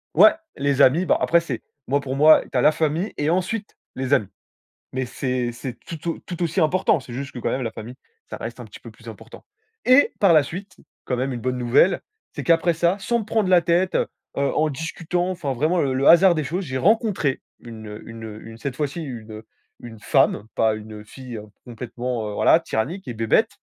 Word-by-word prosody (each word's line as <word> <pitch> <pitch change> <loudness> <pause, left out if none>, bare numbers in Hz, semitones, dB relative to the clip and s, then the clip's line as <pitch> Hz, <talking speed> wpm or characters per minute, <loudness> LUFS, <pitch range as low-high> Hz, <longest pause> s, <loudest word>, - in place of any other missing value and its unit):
Ouais! - - +8 0.2
Les 140 0 +1
amis, 155 +9 +5
bah, - - +3
après, 170 - +3
c'est 135 -9 -5 0.3
moi, 140 +2 +2
pour 135 -1 -4
moi, 155 +2 +7
tu - - -1
as - - +3
la 150 - +6
famille 160 +5 -1
et 150 +1 0
ensuite, 185 +5 -2 0.2
les 130 +1 -1
amis. 100 -7 +2 0.6
Mais 130 0 -2
c'est 125 -1 -2
c'est 120 0 -7
tout 165 0 -7
au - - -5
tout 175 -1 -6
aussi 170 +3 0
important. 165 0 +2
C'est 125 -2 -11
juste 140 +2 -5
que, 125 - -8
quand - - -1
même, 130 - -2
la 115 - -3
famille, 115 +3 -9 0.3
ça - - -5
reste - - -7
un - - -7
petit - - -12
peu - - -11
plus - - -15
important. - - -12 0.4
Et 255 +3 +5
par 195 -4 +5
la 155 -2 +6
suite, 185 +5 -8 0.3
quand 125 - -2
même, 130 +2 -2
une 120 - -5
bonne 125 +1 -2
nouvelle, 125 +9 +3 0.3
c'est - - -5
qu'après 170 0 +3
ça, 170 +4 +1
sans 235 +4 0
me - - -5
prendre 220 -3 0
la 180 -2 +6
tête, 175 +3 +1
heu - - +1 0.3
heu, 140 - 0
en 155 0 +2
discutant, 165 +4 -3
enfin, 170 -7 -3
vraiment 155 +8 0
le 135 -3 0
le 135 +2 0
hasard 175 +1 +7
des 155 - -1
choses, 180 +6 -3
j'ai 130 -4 -3
rencontré 200 - +1 0.2
une, 110 -2 -10
heu 105 +1 -9
une, 115 0 -9
heu, 110 -1 -8
une 115 0 -11
cette 130 +2 -5
fois-ci 150 +3 -3
une, 115 -6 -8
heu, 110 +1 -10 0.3
une 115 -2 -10
femme, 105 - +2
pas 110 -1 +2
une, 110 0 -10
heu, 105 - -13
fille 125 -1 -9 0.3
complètement, 120 -1 -5
heu, 105 - -6
voilà, 165 - +4
tyrannique 160 - -3
et 120 - -4
bébête, 115 0 +2
140 Hz, 230 wpm, -22 LUFS, 120-170 Hz, 0.6 s, Ouais